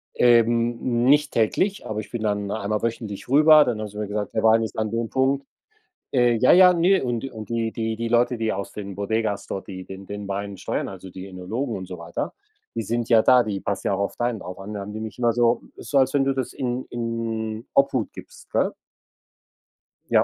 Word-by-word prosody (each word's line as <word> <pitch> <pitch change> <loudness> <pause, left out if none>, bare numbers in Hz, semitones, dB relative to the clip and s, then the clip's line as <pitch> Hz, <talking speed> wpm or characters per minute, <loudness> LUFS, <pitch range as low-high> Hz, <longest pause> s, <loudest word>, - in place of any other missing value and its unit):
Ähm, 120 0 +3
nicht 145 +2 +4
täglich, 185 - +1
aber 110 0 -3
ich 110 - -8
bin 115 -2 -4
dann 105 -1 -1
einmal 105 0 -2
wöchentlich 115 -2 -4
rüber, 150 +2 +7
dann 120 -5 -2
haben 110 - -3
sie 105 - -12
mir 105 -1 -3
gesagt: 105 0 -3
„Der 110 - 0
Wein 115 0 +5
ist 110 - -5
an 110 -1 0
dem 115 -1 -2
Punkt.“ 135 +1 +1 0.7
Äh, 120 -2 +4
ja, 130 +3 +5
ja, 180 0 +8
ne 185 +3 +4
und 120 -1 -2
und 110 -1 -8
die 115 -1 -1
die 110 -1 -2
die 115 0 -2
Leute, 120 +1 +2
die 110 -1 -1
aus 100 +1 -5
den 100 -2 -7
Bodegas 100 +1 -1
dort, 95 - -5
die 95 -1 -7
den 95 0 -10
den 100 -1 -6
Wein 100 0 -4
steuern, - - -2
also, 95 -1 -9
die 95 +1 -8
Önologen 105 +7 -4
und 95 - -6
so 90 - -6
weiter, 85 0 -4 0.4
die 115 - -2
sind 115 +2 -2
ja 115 -2 +6
da, 125 +1 +6
die 100 -2 -3
passt 100 - -3
ja - - +1
auch 95 - -2
auf 100 - -2
deinen 120 -3 -1
auch 90 +1 -8
an. 105 +2 -7
Da 100 - -4
haben 100 +1 -7
die 110 - -6
mich 110 0 -7
immer 120 -1 +2
so 120 0 +2
ist - - -10
so, 140 - +4
als 130 0 +3
wenn 140 -1 +3
du 135 - +2
das 130 -2 -3
in 125 0 -3
in 115 -1 -3
Obhut 130 -5 +2
gibst, - - -13
gell? - - +1 1.4
Ja, - - +5
115 Hz, 230 wpm, -24 LUFS, 105-120 Hz, 1.4 s, ja